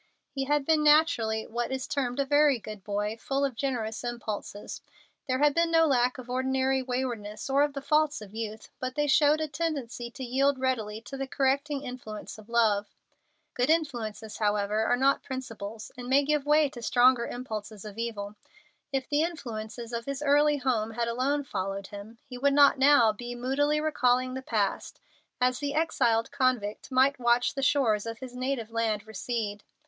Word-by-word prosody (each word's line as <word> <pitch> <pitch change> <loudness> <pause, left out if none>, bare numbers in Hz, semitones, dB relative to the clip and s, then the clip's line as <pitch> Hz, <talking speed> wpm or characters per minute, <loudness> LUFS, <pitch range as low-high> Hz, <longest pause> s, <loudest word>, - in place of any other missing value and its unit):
He 270 -1 -3
had 290 0 +1
been 315 -1 +3
naturally 295 -8 +3
what 240 +3 -3
is 265 -1 -2
termed 280 -3 -2
a 280 - +2
very 290 -1 +4
good 215 -3 -9
boy, 210 +2 -2
full 275 +4 -1
of 270 -4 -3
generous 230 -4 -3
impulses. 220 -4 -5 0.5
There 255 -1 +1
had 295 +1 +4
been 335 +2 +2
no 325 0 +5
lack 250 -4 +2
of 255 -1 -9
ordinary 265 +1 0
waywardness 245 -3 -4
or 275 +1 +4
of 290 -1 +2
the 275 -1 -6
faults 305 0 +2
of 210 -2 -11
youth, 220 -1 -6
but 255 0 -4
they 295 - +1
showed 295 +2 +4
a 315 - -1
tendency 275 -6 -3
to 260 - -8
yield 270 +3 +2
readily 225 -5 -2
to 270 +4 -8
the 270 0 -3
correcting 280 +2 0
influence 220 -4 -7
of 215 +1 -15
love. 215 -3 +1 0.6
Good 250 +2 0
impulses, 235 -9 -1
however, 210 0 +1
are 245 - +2
not 275 +2 +3
principles, 225 -5 -7
and 245 -1 -8
may 275 +2 +4
give 295 -1 0
way 300 0 +5
to 245 -3 -10
stronger 245 0 +4
impulses 215 -4 -6
of 210 +1 -8
evil. 210 -3 -4 0.6
If 270 -1 -2
the 295 0 +1
influences 240 -7 -5
of 235 0 -3
his 275 +1 -4
early 295 +1 +4
home 235 -5 -1
had 235 +1 -1
alone 270 +5 0
followed 195 -5 -4
him, 205 +3 -10
he 250 -1 -9
would 280 +2 +3
not 280 -1 +6
now 265 -5 +6
be 240 +3 -7
moodily 280 +5 +1
recalling 255 -4 +1
the 260 - -4
past 210 -6 -2 0.4
as 250 0 +2
the 285 0 -3
exiled 235 -8 +1
convict 255 -6 -1
might 265 +1 +3
watch 240 0 +2
the 275 - -3
shores 235 -6 +2
of 225 0 -5
his 250 +1 -9
native 250 -3 -3
land 220 -2 -1
recede. 220 -2 -4
255 Hz, 185 wpm, -28 LUFS, 225-280 Hz, 0.6 s, not